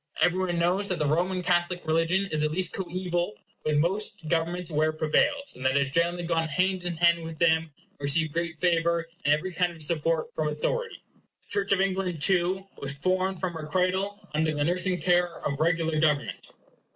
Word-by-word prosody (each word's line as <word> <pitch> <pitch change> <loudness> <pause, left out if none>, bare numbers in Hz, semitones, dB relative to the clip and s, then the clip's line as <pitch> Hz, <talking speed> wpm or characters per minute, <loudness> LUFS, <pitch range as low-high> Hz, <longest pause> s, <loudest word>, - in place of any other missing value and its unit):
Every 180 +1 +3
one 180 -2 -1
knows 180 +4 +1
that 180 - -1
the 150 - 0
Roman 180 +5 0
Catholic 175 -1 0
religion 165 +5 +1
is 155 - 0
at 150 - +2
least 180 +3 0
co 190 - -2
eval 175 -6 -2 0.3
with 150 -1 +1
most 195 +7 +1
of 205 - -19
the 160 +1 0
governments 170 +1 -2
where 155 +1 +2
it 155 - -6
prevails; 280 - +1
that 130 +1 +1
it - - +5
has 140 -1 +1
generally 170 +3 +1
gone 165 -1 0
hand 185 +4 0
in 175 -2 -3
hand 170 0 +3
with 160 -1 -7
them, 160 -1 +3
and 200 +2 -33
received 145 +2 +1
great 170 -1 -2
favor 170 0 +1 0.2
and 145 - +3
every 180 +4 -5
kind 175 +1 +1
of 165 - -14
support 165 0 -1
from 155 - -1
authority. 465 - -2 0.4
The - - -30
Church 200 -1 +2
of 195 -1 +4
England 190 -3 -1
too 185 +3 +2
was 140 0 -2
formed 185 +4 0
from 185 -2 -2
her 160 -2 -6
cradle 190 +4 -1
under 155 0 +1
the 145 - 0
nursing 180 +2 0
care 175 -1 +2
of 140 0 -2
regular 165 -1 +1
government. 150 -2 0
170 Hz, 210 wpm, -27 LUFS, 155-185 Hz, 0.4 s, it